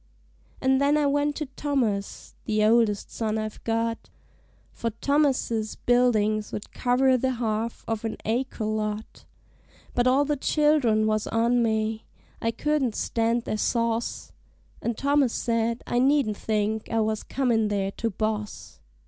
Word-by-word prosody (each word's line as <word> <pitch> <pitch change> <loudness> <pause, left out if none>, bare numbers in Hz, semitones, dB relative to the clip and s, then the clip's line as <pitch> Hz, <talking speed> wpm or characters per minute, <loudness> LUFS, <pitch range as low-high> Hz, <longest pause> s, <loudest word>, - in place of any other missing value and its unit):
An' 265 0 +3
then 285 +2 +3
I 300 - +2
went 290 +1 +1
to 305 - -3
Thomas, 260 -8 -2
the 215 -1 +1
oldest 220 -2 +2
son 220 -1 -1
I've 215 0 -5
got, 230 0 -2 0.6
For 230 - -3
Thomas's 245 -3 0
buildings'd 215 -4 +1
cover 255 +1 +2
the 260 +1 0
half 225 -1 -3
of 225 -1 -2
an 225 - -3
acre 230 0 -1
lot; 215 0 -3 0.7
But 245 0 +2
all 270 +3 +4
the 295 0 0
child'rn 280 -7 +2
was 215 -1 0
on 235 +2 +2
me 220 -1 0 0.4
I 230 - +1
couldn't 270 -2 0
stand 230 +1 0
their 215 - -2
sauce 230 +1 -1 0.5
And 235 -2 -2
Thomas 280 -3 +2
said 230 0 -1
I 240 - 0
needn't 265 -5 +2
think 215 0 -1
I 225 - 0
was 215 0 0
comin' 235 -5 +1
there 200 -2 -1
to 230 +3 -2
boss. 215 0 -4
230 Hz, 140 wpm, -26 LUFS, 215-260 Hz, 0.7 s, all